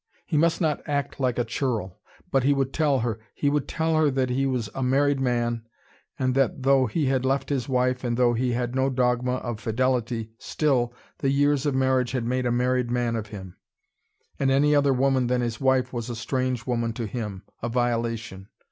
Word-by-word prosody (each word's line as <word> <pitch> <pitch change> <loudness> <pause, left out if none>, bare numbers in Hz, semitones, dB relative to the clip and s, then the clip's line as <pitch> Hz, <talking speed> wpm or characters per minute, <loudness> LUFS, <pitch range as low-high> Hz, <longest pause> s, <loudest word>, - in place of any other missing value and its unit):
He 160 - -3
must 165 +2 +3
not 155 -4 0
act 145 -1 -2
like 130 -3 0
a 120 - +1
churl. 115 -6 -2 0.3
But 135 - +3
he 140 +2 +3
would 135 -1 -1
tell 145 -5 +2
her 115 -2 -2 0.2
he 145 - +1
would 145 -1 0
tell 160 0 0
her 155 -1 +4
that 130 -2 0
he 135 +2 +1
was 125 -4 -1
a 135 - -4
married 140 +2 +2
man, 120 -2 0 0.6
and 130 -1 +1
that 135 0 +1
though 135 -1 +4
he 145 +8 -1
had 130 -1 +1
left 135 +1 0
his 135 -3 -1
wife, 125 0 +1
and 120 -1 -1
though 120 -1 +4
he 125 +1 0
had 120 0 -2
no 130 +1 +1
dogma 125 -1 +1
of 120 -3 -4
fidelity, 115 0 -1
still, 130 -6 0 0.3
the 135 - +1
years 145 +1 +2
of 140 - 0
marriage 130 -2 +1
had 125 -3 -1
made 125 +1 0
a - - +1
married 125 0 +1
man 120 -1 0
of 110 -2 -3
him, 95 -4 -9 0.8
and 135 - +2
any 145 +2 +4
other 140 -1 +4
woman 130 -1 +2
than 125 0 +1
his 115 -1 -3
wife 130 -1 +2
was 120 -1 -4
a 120 - -4
strange 130 0 -2
woman 115 -2 -1
to 115 0 -4
him, 105 -3 -5 0.2
a 120 - -2
violation. 115 -5 -2
125 Hz, 210 wpm, -25 LUFS, 120-135 Hz, 0.8 s, her